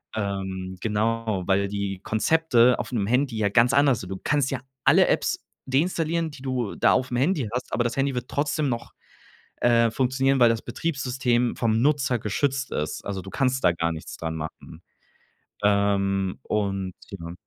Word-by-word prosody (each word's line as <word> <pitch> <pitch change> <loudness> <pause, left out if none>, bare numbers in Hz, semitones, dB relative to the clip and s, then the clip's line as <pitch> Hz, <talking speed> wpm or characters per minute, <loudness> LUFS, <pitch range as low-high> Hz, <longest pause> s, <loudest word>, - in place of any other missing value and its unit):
Ähm, 95 -2 -3
genau, 110 -2 -1
weil 100 +1 +2
die 100 -1 -3
Konzepte 125 0 +3
auf - - -4
’nem 105 -5 0
Handy 125 +1 +1
ja 105 -2 +1
ganz 120 +4 +4
anders 140 -4 +4
sind. 90 - -8
Du 95 - -5
kannst 145 -2 +1
ja 130 -2 -3 0.2
alle - - +5
Apps - - 0 0.2
deinstallieren, 165 +3 0
die 140 - -12
du 130 -5 -2
da - - +4
auf’m 125 -1 0
Handy 145 - +1
hast, 125 - -4
aber 120 - +1
das 120 +1 -2
Handy 135 -1 0
wird 125 0 -3
trotzdem 145 0 -1
noch, 120 -1 -4 0.7
äh, 115 -1 +4
funktionieren, 130 +1 +1
weil 120 - +7
das 115 -1 0
Betriebssystem 125 -3 -1
vom 115 0 +1
Nutzer 140 -4 +2
geschützt 135 +6 -1
ist. 75 +1 -3
Also, 100 -2 -4
du 95 - -9
kannst 130 -1 0
da - - +5
gar 85 0 -1
nichts 80 - -8
dran 80 -1 -4
machen. 80 +1 -8 0.8
Ähm, 100 -2 +1
und 95 -3 -2 0.2
ja. 85 -3 -7
115 Hz, 170 wpm, -25 LUFS, 100-135 Hz, 0.8 s, weil